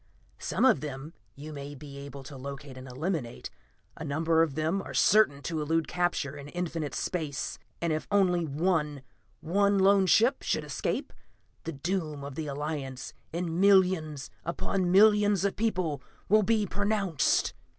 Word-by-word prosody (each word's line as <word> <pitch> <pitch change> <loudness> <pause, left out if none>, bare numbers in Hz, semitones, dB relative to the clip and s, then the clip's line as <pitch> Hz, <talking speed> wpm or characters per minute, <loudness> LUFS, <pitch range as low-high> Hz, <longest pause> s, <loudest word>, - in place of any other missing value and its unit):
Some - - 0
of 255 - +5
them 150 +1 -6 0.2
you 150 +2 -8
may 140 0 -7
be 140 0 -10
able 140 -1 -9
to 140 +1 -10
locate 140 0 -8
and 130 +1 -9
eliminate; 135 -1 -4 0.4
a - - -7
number 160 +2 +2
of 155 -5 +1
them 160 +5 0
are - - -8
certain 145 -10 +4
to 160 -3 -2
elude 160 +2 0
capture 175 -5 -1
in 140 0 -9
infinite 165 -2 -3
space 145 -9 -3 0.2
and 170 -2 0
if 155 - -3
only 185 -4 +3
one, 150 -2 0 0.4
one 200 +4 +2
lone 195 0 +5
ship, 230 +8 +4
should - - -1
escape, - - -3 0.5
the 165 - -2
doom 155 -1 -3
of 140 0 -6
the 155 +2 -4
Alliance 140 -2 -4 0.2
and 170 +1 -2
millions 180 -7 +3
upon 175 +2 -1
millions 205 0 +5
of 200 - 0
people 180 - -1 0.3
will 215 +2 +5
be 215 0 +2
pronounced. 200 -6 +1
160 Hz, 155 wpm, -29 LUFS, 140-190 Hz, 0.5 s, of